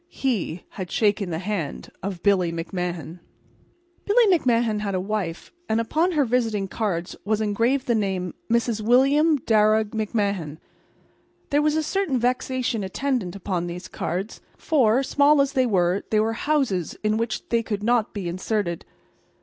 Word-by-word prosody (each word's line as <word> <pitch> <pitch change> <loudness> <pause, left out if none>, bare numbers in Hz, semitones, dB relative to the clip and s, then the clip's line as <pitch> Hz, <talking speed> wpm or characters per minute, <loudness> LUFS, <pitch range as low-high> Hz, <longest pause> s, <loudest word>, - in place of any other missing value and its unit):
He 210 - -2
had 185 -3 -7
shaken 205 -2 +1
the 160 - -2
hand 180 -5 -4
of 190 -2 -5
Billy 185 -4 +3
McMahan. 175 0 -4 0.8
Billy 455 +3 +4
McMahan 235 -7 +1
had 200 -2 -2
a - - +1
wife, 190 -4 -3 0.2
and 220 - +2
upon 320 +10 +1
her 295 -3 +3
visiting 225 -5 0
cards 185 -5 -3
was 215 +1 0
engraved 230 +6 +1
the 240 - +1
name 190 -5 -1 0.2
"Mrs. 235 -1 +1
William 275 +7 +4
Darragh 215 -1 +3
McMahan." 210 -2 -1
And 150 -1 -8 0.9
there 290 +1 +3
was 300 0 +2
a 315 - +1
certain 345 -4 0
vexation 250 -2 -1
attendant 210 -2 -2
upon 180 -3 -2
these 175 +1 -6
cards; 190 +5 -4 0.2
for, 260 -5 +2
small 290 +2 +4
as 275 0 +2
they 260 -2 +2
were, 185 -2 +1
there 215 -1 +3
were 225 +1 0
houses 235 - 0
in 215 0 +1
which 230 0 -3
they 230 -1 +2
could 210 -2 -4
not 235 -1 +2
be 195 -4 -5
inserted. 185 0 -2
215 Hz, 160 wpm, -24 LUFS, 185-250 Hz, 0.9 s, Billy